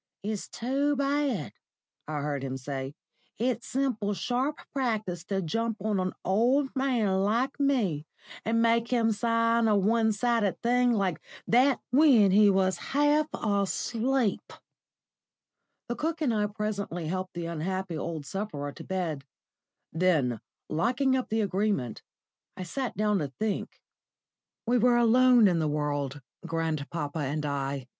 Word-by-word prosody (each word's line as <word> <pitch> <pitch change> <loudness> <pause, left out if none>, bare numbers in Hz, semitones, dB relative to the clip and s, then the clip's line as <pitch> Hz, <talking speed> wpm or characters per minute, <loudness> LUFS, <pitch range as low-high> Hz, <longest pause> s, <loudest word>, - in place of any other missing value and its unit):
"It's 210 0 -3
too 275 +4 0
bad," 280 - 0 0.5
I 150 -1 -3
heard 145 -1 -2
him 130 -1 -3
say. 135 +1 -5 0.4
"It's 240 +1 -1
simple 240 -6 -1
sharp 255 - -1
practice 215 - -2
to 195 0 -2
jump 225 +6 -1
on 205 0 -1
an 185 0 -1
old 250 +9 +2
man 240 -8 +1
like 235 +8 0
me, 210 - +1 0.4
and 230 +1 +1
make 230 0 +3
him 230 -2 +2
sign 230 +1 +2
a 215 - +4
one 220 +3 +2
sided 220 -2 0
thing 245 +1 +3
like 195 -7 0 0.2
that 255 +3 +3
when 250 -8 +6
he 205 +1 +6
was 190 -1 +2
half 295 +2 +2
asleep!" 220 +3 -1 1.4
The 240 - -2
cook 320 +5 -2
and 280 -7 +1
I 210 -1 +1
presently 205 -5 -4
helped 185 +3 -4
the 170 -1 -4
unhappy 175 +2 -3
old 155 -1 -4
sufferer 145 -7 -4
to - - -11
bed. 170 -7 -3 0.7
Then, 155 - +1 0.3
locking 255 - +1
up 255 - -2
the 220 +1 +1
Agreement, 195 - -1 0.6
I 185 - -4
sat 255 +8 -4
down 210 -1 +2
to 150 - -2
think. 215 -2 -2 0.9
We 245 +1 +2
were 240 +1 +4
alone 240 -1 +6
in 175 -3 +2
the 155 - +1
world, 145 -2 -2 0.2
grandpapa 160 -2 -3
and 150 +1 -2
I. 140 -2 -2
210 Hz, 140 wpm, -28 LUFS, 170-245 Hz, 1.4 s, when